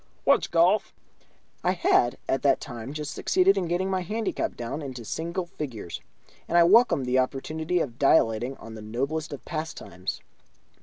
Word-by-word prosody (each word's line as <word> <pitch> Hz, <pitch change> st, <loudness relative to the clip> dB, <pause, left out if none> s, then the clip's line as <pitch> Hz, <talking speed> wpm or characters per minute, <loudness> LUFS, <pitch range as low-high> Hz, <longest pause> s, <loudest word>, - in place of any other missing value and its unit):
"What's -, -, +4 dB
golf?" -, -, +2 dB, 0.7 s
I -, -, +2 dB
had 120 Hz, 0 st, +2 dB
at 135 Hz, -, 0 dB
that 140 Hz, -2 st, +3 dB
time 120 Hz, -3 st, -7 dB
just 150 Hz, -1 st, -5 dB
succeeded 190 Hz, +2 st, +3 dB
in 190 Hz, -3 st, -1 dB
getting 175 Hz, +3 st, 0 dB
my 190 Hz, -1 st, 0 dB
handicap 215 Hz, +4 st, -2 dB
down 120 Hz, +6 st, -4 dB
into 130 Hz, -5 st, -7 dB
single 170 Hz, -, -3 dB
figures, 125 Hz, -, -6 dB, 0.5 s
and 170 Hz, -, +2 dB
I 170 Hz, -, +8 dB
welcomed 195 Hz, -, +5 dB
the 125 Hz, +1 st, +2 dB
opportunity 155 Hz, +6 st, -1 dB
of 125 Hz, -7 st, -3 dB
dilating 125 Hz, -2 st, +3 dB
on 115 Hz, -, -10 dB
the 110 Hz, -, -8 dB
noblest 140 Hz, +9 st, -3 dB
of 145 Hz, -, -8 dB
pastimes. 155 Hz, -, -5 dB
145 Hz, 160 wpm, -26 LUFS, 125-170 Hz, 0.7 s, I